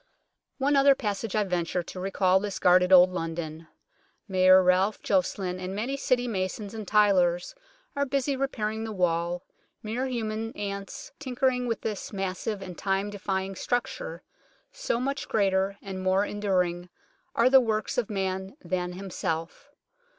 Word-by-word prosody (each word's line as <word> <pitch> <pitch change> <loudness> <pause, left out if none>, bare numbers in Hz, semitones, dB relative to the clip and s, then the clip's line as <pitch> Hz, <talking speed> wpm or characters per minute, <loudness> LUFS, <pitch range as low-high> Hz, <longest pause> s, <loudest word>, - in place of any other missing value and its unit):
One 285 +1 +2
other 275 0 +6
passage 210 -3 -3
I 215 - +3
venture, 180 -2 -1
to 180 - -8
recall 190 0 +2
this 200 0 -4
guarded 180 +1 +4
Old 185 0 +8
London. 165 -2 -5 0.6
Mayor 185 -1 +6
Ralph 185 +3 +3
Joceline 185 -1 0
and 185 +1 -5
many 240 +7 -2
City 250 -2 +1
masons 200 0 -3
and 215 -3 -6
tylers 185 -5 +3 0.4
are 280 - +1
busy 275 +1 0
repairing 220 -5 -2
the 220 - -4
wall, 175 -2 0 0.4
mere 235 +5 -2
human 225 -2 -3
ants 200 - -5
tinkering 255 -2 0
with 230 - -2
this 215 -3 -4
massive 195 +1 -3
and 180 -2 -8
time 195 +1 0
defying 195 -1 -2
structure, - - -3 0.5
so - - -2
much 275 +2 -2
greater 195 -1 +1
and 190 -1 -5
more 190 +2 +2
enduring 180 -4 -1 0.5
are 235 - +4
the 265 -1 +8
works 220 -1 -1
of 235 - -2
man 190 +2 -3
than 180 -1 -2
himself. 180 - -4
195 Hz, 145 wpm, -27 LUFS, 185-225 Hz, 0.6 s, Old